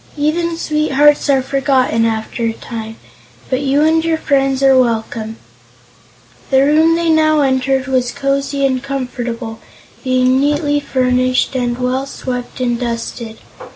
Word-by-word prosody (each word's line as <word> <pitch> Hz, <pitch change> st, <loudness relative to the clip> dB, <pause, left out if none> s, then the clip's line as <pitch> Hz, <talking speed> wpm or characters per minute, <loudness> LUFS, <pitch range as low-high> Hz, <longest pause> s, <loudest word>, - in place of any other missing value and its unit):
"Even 330 Hz, +3 st, 0 dB
sweethearts 295 Hz, -2 st, +2 dB
are 270 Hz, -2 st, +3 dB
forgotten 265 Hz, -4 st, +1 dB
after 225 Hz, +2 st, -3 dB
a 225 Hz, -, 0 dB
time, 225 Hz, -1 st, -7 dB, 0.6 s
but 255 Hz, +1 st, 0 dB
you 280 Hz, +1 st, +1 dB
and 320 Hz, +1 st, +3 dB
your 330 Hz, -1 st, 0 dB
friends 275 Hz, -3 st, 0 dB
are 270 Hz, -1 st, +5 dB
welcome." 225 Hz, -2 st, -1 dB, 1.1 s
The 265 Hz, 0 st, +4 dB
room 315 Hz, +3 st, +4 dB
they 335 Hz, -1 st, +1 dB
now 310 Hz, -1 st, +3 dB
entered 265 Hz, -1 st, +1 dB
was 255 Hz, -2 st, 0 dB
cosy 275 Hz, 0 st, -1 dB
and 260 Hz, -2 st, 0 dB
comfortable, 245 Hz, -4 st, -5 dB, 0.4 s
being 255 Hz, 0 st, +2 dB
neatly 290 Hz, +1 st, +1 dB
furnished 255 Hz, -2 st, 0 dB
and 240 Hz, -1 st, -1 dB
well 255 Hz, +2 st, -1 dB
swept 250 Hz, -2 st, -6 dB
and 240 Hz, -2 st, -1 dB
dusted. 230 Hz, -1 st, -5 dB
265 Hz, 135 wpm, -16 LUFS, 250-290 Hz, 1.1 s, are